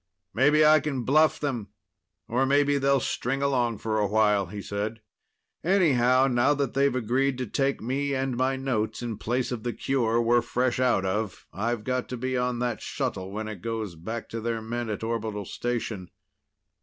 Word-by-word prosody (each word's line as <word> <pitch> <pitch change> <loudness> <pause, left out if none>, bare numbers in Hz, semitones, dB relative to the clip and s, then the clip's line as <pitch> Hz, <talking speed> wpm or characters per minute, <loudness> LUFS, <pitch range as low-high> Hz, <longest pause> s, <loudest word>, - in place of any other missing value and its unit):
"Maybe 150 +5 +4
I 155 0 +7
can 135 -4 -3
bluff 155 +4 +4
them, 125 -8 -2 0.6
or 125 +3 +1
maybe 145 +1 +3
they'll 140 0 +3
string 135 +2 -2
along 120 -5 +1
for 110 0 -1
a 105 - +2
while," 105 -2 +2
he 100 +4 -7
said. 105 +3 -4 0.6
"Anyhow, 135 -9 +4
now 130 +2 +3
that 140 -3 -1
they've 140 -1 +2
agreed 130 +3 +1
to 130 - -2
take 135 +4 0
me 140 +3 -1
and 130 -1 -1
my 130 +2 +1
notes 125 -4 -2
in 115 -3 -4
place 125 +3 -1
of 120 -3 -3
the 120 +1 -3
cure 120 -4 0
we're 120 +1 +3
fresh 125 +1 0
out 125 -7 +2
of, 105 +2 -2
I've 115 +2 -2
got 125 +1 -2
to 125 - -4
be 130 +2 -2
on 125 -1 0
that 120 -2 -2
shuttle 95 -1 -3
when 110 +2 -4
it 105 -5 -7
goes 110 -4 -3
back 110 +8 -6
to 115 - -5
their 115 0 -1
men 115 +1 -4
at 105 +1 -4
orbital 110 -3 -3
station." 115 -6 -3
120 Hz, 185 wpm, -27 LUFS, 110-135 Hz, 0.6 s, I